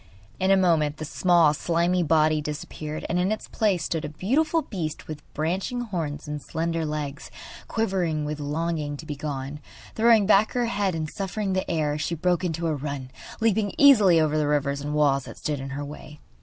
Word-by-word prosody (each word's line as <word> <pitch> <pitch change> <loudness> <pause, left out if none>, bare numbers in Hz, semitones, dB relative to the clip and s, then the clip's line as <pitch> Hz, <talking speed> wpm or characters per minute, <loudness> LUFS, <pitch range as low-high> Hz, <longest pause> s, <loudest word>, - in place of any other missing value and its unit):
In 190 - +1
a 195 - +6
moment 160 -5 +2
the 155 - -5
small, 170 -1 +4
slimy 170 +3 +1
body 155 -1 +3
disappeared, 150 +1 -5
and 175 - 0
in 185 +3 +1
its 215 - -3
place 195 -7 +1
stood 160 -1 -2
a 150 - -4
beautiful 300 - +1
beast 160 -6 -5
with 155 -1 -6
branching 185 +10 -1
horns 160 -10 -4
and 150 0 -4
slender 165 +1 -2
legs, 150 -2 -4 0.4
quivering 180 -9 -1
with 150 0 -4
longing 150 0 -2
to 155 - -10
be 150 -2 -5
gone. 140 0 -5 0.3
Throwing 225 -2 +5
back 210 +1 +4
her 245 -1 +1
head 200 -5 0
and 155 -1 -2
snuffing 195 +3 -3
the 185 - -1
air, 155 -3 0
she 170 - -1
broke 180 +2 +1
into 170 -1 -2
a 160 - +1
run, 140 -2 -5 0.3
leaping 215 -2 +2
easily 210 -12 +7
over 155 -1 +2
the 150 - +1
rivers 140 -1 0
and 145 +1 -3
walls 140 -3 +2
that - - -10
stood 150 -2 -3
in 135 +1 -6
her 140 +1 -4
way. 150 +1 -10
160 Hz, 195 wpm, -25 LUFS, 150-190 Hz, 0.4 s, easily